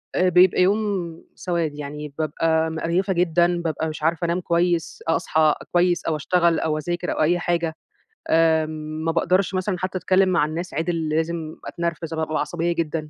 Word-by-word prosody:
آآ 185 Hz, 0 st, +3 dB
بيبقى 180 Hz, +1 st, +5 dB
يوم 190 Hz, -4 st, 0 dB
سواد، 170 Hz, -4 st, -2 dB
يعني 150 Hz, 0 st, -7 dB
بابقى 160 Hz, +1 st, +1 dB
مقرْيفة 170 Hz, +4 st, -1 dB
جدًا، 175 Hz, 0 st, +2 dB
بابقى 160 Hz, -1 st, -2 dB
مش 155 Hz, 0 st, -7 dB
عارفة 165 Hz, +2 st, +1 dB
أنام 170 Hz, +2 st, 0 dB
كويس، 170 Hz, -1 st, 0 dB
أ 165 Hz, -, +4 dB
أصحى 155 Hz, -1 st, +2 dB, 0.2 s
كويس، 175 Hz, -1 st, +2 dB
أو 160 Hz, -, 0 dB
أشتغل 170 Hz, +2 st, +2 dB
أو 155 Hz, -1 st, -1 dB
أذاكر 175 Hz, +3 st, -3 dB
أو -, -, -2 dB
أي 175 Hz, +3 st, +3 dB
حاجة. 170 Hz, -2 st, -1 dB, 0.5 s
آمم 155 Hz, -1 st, +1 dB
ما 165 Hz, -, +2 dB
باقدرش 185 Hz, +3 st, +1 dB
مثلًا 185 Hz, 0 st, -1 dB
حتى 185 Hz, +1 st, -3 dB
أتكلم 185 Hz, +2 st, +3 dB
مع 170 Hz, -5 st, +3 dB
الناس 165 Hz, +4 st, -5 dB
عِدِل 165 Hz, 0 st, -1 dB
لازم 160 Hz, 0 st, -2 dB
أتنرفز 170 Hz, -1 st, -4 dB
أب 160 Hz, -, -3 dB
بابقى 155 Hz, -1 st, -1 dB
عصبية 175 Hz, 0 st, -1 dB
جدًا. 155 Hz, -2 st, -2 dB
165 Hz, 175 wpm, -23 LUFS, 160-175 Hz, 0.5 s, بيبقى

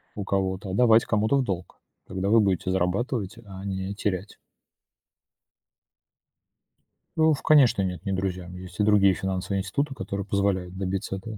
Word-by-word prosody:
у 100 Hz, -, -4 dB
кого-то, 95 Hz, 0 st, -1 dB
а -, -, -4 dB
давать 115 Hz, +1 st, +5 dB
кому-то 110 Hz, +5 st, +2 dB
в 135 Hz, -, +2 dB
долг. 95 Hz, -6 st, -5 dB, 0.3 s
Тогда 95 Hz, +1 st, -2 dB
вы 115 Hz, +2 st, +6 dB
будете 95 Hz, -3 st, +1 dB
зарабатывать, 100 Hz, +4 st, -1 dB
а 95 Hz, -1 st, -9 dB
не 95 Hz, 0 st, -3 dB
терять. 100 Hz, -1 st, -3 dB, 2.8 s
Э, 160 Hz, -, +1 dB
в, 160 Hz, -2 st, +3 dB
конечно, 140 Hz, -9 st, +5 dB
нет, 90 Hz, 0 st, -3 dB
не 100 Hz, -, -1 dB
друзьям. 90 Hz, -2 st, -3 dB
Есть 90 Hz, +1 st, -10 dB
и 105 Hz, -, +3 dB
другие 100 Hz, -2 st, +5 dB
финансовые 95 Hz, +1 st, -2 dB
институты, 140 Hz, +5 st, -2 dB
которые 100 Hz, -1 st, -4 dB
позволяют 95 Hz, -3 st, -1 dB
добиться 95 Hz, +1 st, -3 dB
этого. 105 Hz, +2 st, -8 dB
95 Hz, 155 wpm, -26 LUFS, 95-105 Hz, 2.8 s, вы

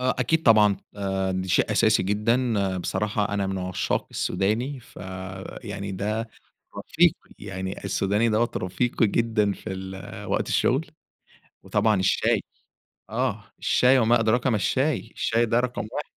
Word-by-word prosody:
آه، 130 Hz, -, +1 dB
أكيد 155 Hz, +6 st, +1 dB
طبعًا 105 Hz, -6 st, +5 dB, 0.2 s
آآ، 95 Hz, -1 st, -1 dB
ده 95 Hz, 0 st, -3 dB
شيء -, -, +2 dB
أساسي -, -, +3 dB
جدًا، 105 Hz, -1 st, +1 dB
بصراحة 105 Hz, +3 st, -1 dB
أنا 100 Hz, -1 st, 0 dB
من 95 Hz, 0 st, -2 dB
عشاق 90 Hz, 0 st, -2 dB
السوداني 120 Hz, +8 st, -1 dB
ف -, -, -20 dB, 0.7 s
يعني 100 Hz, -2 st, -5 dB
ده 105 Hz, +4 st, -2 dB, 0.5 s
رفيقي، -, -, +3 dB, 0.2 s
يعني 95 Hz, -1 st, -6 dB
السوداني 105 Hz, +4 st, +1 dB
دوَّة 115 Hz, +2 st, +1 dB
رفيقي 115 Hz, +5 st, 0 dB
جدًا 110 Hz, -1 st, +1 dB
في 95 Hz, -, -8 dB
ال 95 Hz, 0 st, -7 dB
وقت -, -, -1 dB
الشغل، 135 Hz, +6 st, +1 dB, 0.8 s
وطبعًا 105 Hz, -1 st, +2 dB
الشاي، 95 Hz, -, +2 dB, 0.7 s
آه، 115 Hz, -3 st, -2 dB
الشاي 130 Hz, +1 st, +4 dB
وما 115 Hz, +1 st, +4 dB
أدراك 115 Hz, +3 st, +2 dB
ما 120 Hz, -, +2 dB
الشاي، 130 Hz, +3 st, 0 dB
الشاي 115 Hz, +1 st, +1 dB
ده 115 Hz, +2 st, +2 dB
رقم 125 Hz, -3 st, -2 dB
1. -, -, -3 dB
105 Hz, 140 wpm, -25 LUFS, 95-120 Hz, 0.8 s, طبعًا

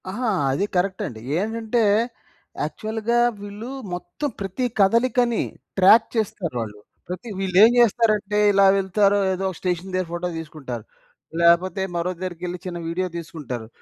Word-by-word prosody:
ఆహా! 230 Hz, +5 st, -2 dB, 0.2 s
అది 145 Hz, +9 st, 0 dB
కరె‌క్ట్ం‌డి. 180 Hz, -, -1 dB, 0.2 s
ఏంటంటే, 225 Hz, +3 st, -1 dB, 0.8 s
యాక్చువల్‌గా 220 Hz, +9 st, -2 dB, 0.2 s
వీళ్ళు 205 Hz, +4 st, -7 dB, 0.2 s
మొత్తం 175 Hz, -, -4 dB
ప్రతి 195 Hz, +5 st, -2 dB
కదలికని 235 Hz, +3 st, +3 dB, 0.4 s
ట్రాప్ 205 Hz, +4 st, +7 dB
చేస్తారు 195 Hz, -, -2 dB
వాళ్ళు. 105 Hz, -2 st, -7 dB, 0.3 s
ప్రతి 180 Hz, +6 st, -6 dB
వీళ్ళేం 195 Hz, +3 st, +6 dB
జేస్తారంటే, 215 Hz, -3 st, +3 dB
ఇలా 200 Hz, 0 st, +5 dB
వెళ్తారో 200 Hz, +1 st, +2 dB
ఏదోక 190 Hz, 0 st, -2 dB
స్టేషన్ 180 Hz, +1 st, -2 dB
దగ్గర 185 Hz, -1 st, -1 dB
ఫోటో 175 Hz, +1 st, -2 dB
తీసుకుంటారు. 140 Hz, -8 st, -7 dB, 0.6 s
లేపోతే, 170 Hz, +2 st, +4 dB
మరో 170 Hz, +1 st, -1 dB
దరికెళ్లి 180 Hz, 0 st, -4 dB
చిన్న 180 Hz, -1 st, -4 dB
వీడియో 180 Hz, +3 st, -1 dB
దీసుకుంటారు. 150 Hz, -9 st, -6 dB
190 Hz, 120 wpm, -23 LUFS, 175-215 Hz, 0.8 s, ట్రాప్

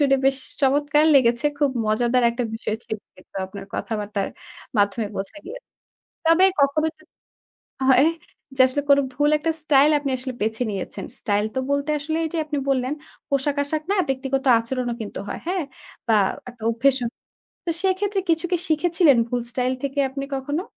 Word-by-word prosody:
শুনে 275 Hz, -2 st, +4 dB
বেশ 270 Hz, 0 st, +3 dB, 0.3 s
চমৎকার 290 Hz, +3 st, +3 dB
লেগেছে 240 Hz, -1 st, +4 dB
খুব 290 Hz, -2 st, +3 dB, 0.2 s
মজাদার 240 Hz, +3 st, +2 dB
একটা 240 Hz, +1 st, -3 dB
বিষয় 220 Hz, -1 st, -3 dB
ছিল -, -, -3 dB, 0.2 s
কিন্তু 185 Hz, -, -20 dB
আপনার 195 Hz, +1 st, -9 dB
কথাবার্তার 210 Hz, -2 st, -3 dB, 0.5 s
মাধ্যমে 205 Hz, +2 st, +2 dB
বোঝা 195 Hz, +9 st, -5 dB
গিয়েছে। -, -, -10 dB, 0.6 s
তবে 330 Hz, +3 st, +6 dB, 0.2 s
কখনো 280 Hz, +3 st, +3 dB
যদি -, -, -24 dB, 0.8 s
হয় 265 Hz, +3 st, +6 dB, 0.5 s
যে -, -, -4 dB
আসলে 285 Hz, +3 st, -1 dB
কোন 280 Hz, -, +7 dB, 0.2 s
ভুল 290 Hz, +3 st, +2 dB
একটা 325 Hz, +2 st, -1 dB
স্টাইল 295 Hz, -1 st, +5 dB
আপনি 285 Hz, -1 st, -3 dB
আসলে 260 Hz, +1 st, -5 dB
বেছে 220 Hz, +3 st, -1 dB
নিয়েছেন। 195 Hz, -3 st, -5 dB, 0.2 s
স্টাইল 205 Hz, 0 st, +1 dB
তো -, -, +2 dB
বলতে 280 Hz, +1 st, 0 dB
আসলে 315 Hz, +2 st, -2 dB
এই -, -, -1 dB
যে -, -, 0 dB
আপনি 295 Hz, -1 st, -2 dB
বললেন, 260 Hz, 0 st, +1 dB, 0.4 s
পোশাক-আশাক 285 Hz, +2 st, 0 dB
না -, -, +1 dB
ব্যক্তিগত 270 Hz, 0 st, -1 dB
আচরণও 240 Hz, +1 st, -3 dB
কিন্তু 210 Hz, -, -6 dB
হয় -, -, -5 dB
হ্যাঁ? 360 Hz, -1 st, -1 dB, 0.4 s
বা 225 Hz, -, +5 dB, 0.4 s
একটা 230 Hz, -2 st, -19 dB
অভ্যেসও। 245 Hz, +2 st, +2 dB, 0.6 s
তো -, -, +1 dB
সেক্ষেত্রে 385 Hz, +1 st, +1 dB
কিছু 325 Hz, +1 st, +1 dB
কি -, -, +5 dB
শিখেছিলেন 320 Hz, -2 st, +4 dB
ভুল 245 Hz, +1 st, -1 dB
স্টাইল 250 Hz, +1 st, 0 dB
থেকে 280 Hz, +1 st, -3 dB
আপনি 275 Hz, +1 st, -4 dB
কখনো? 290 Hz, +6 st, -2 dB
270 Hz, 165 wpm, -23 LUFS, 235-300 Hz, 0.8 s, কোন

